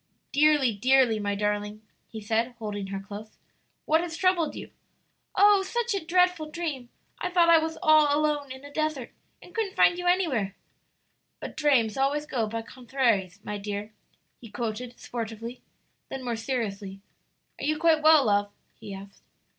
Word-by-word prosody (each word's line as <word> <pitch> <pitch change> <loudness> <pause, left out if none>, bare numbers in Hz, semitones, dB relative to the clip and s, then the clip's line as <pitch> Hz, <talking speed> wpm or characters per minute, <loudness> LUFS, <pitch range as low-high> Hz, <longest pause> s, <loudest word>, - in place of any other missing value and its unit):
"Dearly, 290 -4 +4
dearly, 250 +1 +3
my 205 -1 -1
darling," 210 +1 -2 0.2
he 220 - -8
said, 225 +3 -1
holding 205 -3 -5
her 195 0 -4
close. 205 +2 -10 0.5
"What 320 +2 +3
has 335 -1 -5
troubled 360 -3 +1
you?" - - -8 0.6
"Oh, 405 0 +6
such 475 +4 -2
a 395 - -2
dreadful 360 -2 +2
dream! 305 -7 -4 0.3
I 360 - -2
thought 345 -2 +4
I 330 - +7
was 320 0 -3
all 310 -1 +6
alone 295 -2 0
in 265 +2 -9
a 285 - -12
desert 310 -5 -2 0.3
and - - -15
couldn't 435 -3 -2
find 350 -4 +4
you 355 - -3
anywhere." 275 - +1 0.8
"But - - -7
'drames 265 -8 +2
always 285 +2 +1
go 240 -7 -1
by 225 +1 -4
conthraries, 230 -6 -1
my 210 0 -4
dear,'" 205 +1 -5 0.5
he 230 - -12
quoted 240 +2 -5
sportively. 230 +1 -6 0.5
Then 265 -1 -6
more 240 -1 -1
seriously, 210 -5 -4 0.6
"Are - - -4
you 305 +1 +1
quite 320 -1 +3
well, 310 -3 +6
love?" 205 -1 +1 0.2
he 205 -3 -9
asked. 195 +1 -12
255 Hz, 160 wpm, -27 LUFS, 215-310 Hz, 0.8 s, I